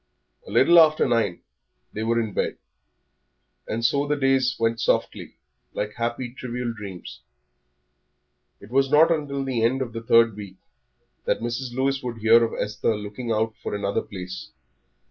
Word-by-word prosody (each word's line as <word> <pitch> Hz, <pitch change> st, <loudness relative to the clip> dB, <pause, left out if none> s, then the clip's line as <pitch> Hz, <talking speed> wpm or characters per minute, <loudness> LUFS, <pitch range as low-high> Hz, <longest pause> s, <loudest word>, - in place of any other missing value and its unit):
A -, -, -9 dB
little 170 Hz, 0 st, +6 dB
after 155 Hz, -1 st, +5 dB
nine 115 Hz, -7 st, 0 dB, 0.5 s
they 110 Hz, -, -4 dB
were 115 Hz, +1 st, +1 dB
in 110 Hz, -3 st, -3 dB
bed, -, -, -1 dB, 1.1 s
and 115 Hz, +2 st, -2 dB
so 140 Hz, +4 st, +2 dB
the 150 Hz, -, +1 dB
days 135 Hz, -3 st, +2 dB
went 115 Hz, 0 st, 0 dB
softly, -, -, -1 dB, 0.4 s
like 105 Hz, 0 st, -3 dB
happy, 120 Hz, +1 st, -3 dB
trivial 125 Hz, -2 st, -4 dB
dreams. 100 Hz, -5 st, -9 dB, 1.4 s
It 100 Hz, -, -15 dB
was 135 Hz, +1 st, +2 dB
not 150 Hz, +3 st, +6 dB
till 145 Hz, -4 st, -1 dB
the 130 Hz, -4 st, -1 dB
end 125 Hz, +4 st, +2 dB
of 125 Hz, -4 st, -4 dB
the 115 Hz, -, -5 dB
third 115 Hz, -1 st, +4 dB
week 100 Hz, -3 st, -9 dB, 0.7 s
that -, -, +1 dB
Mrs. 120 Hz, +1 st, -4 dB
Lewis 135 Hz, +1 st, 0 dB
would 120 Hz, -2 st, -5 dB
hear 115 Hz, +1 st, +5 dB
of 115 Hz, -, -3 dB
Esther 105 Hz, +1 st, -1 dB
looking 105 Hz, +3 st, -6 dB
out 110 Hz, 0 st, 0 dB
for -, -, -4 dB
another 100 Hz, 0 st, -1 dB
place. 95 Hz, -4 st, -8 dB
115 Hz, 160 wpm, -24 LUFS, 110-130 Hz, 1.4 s, little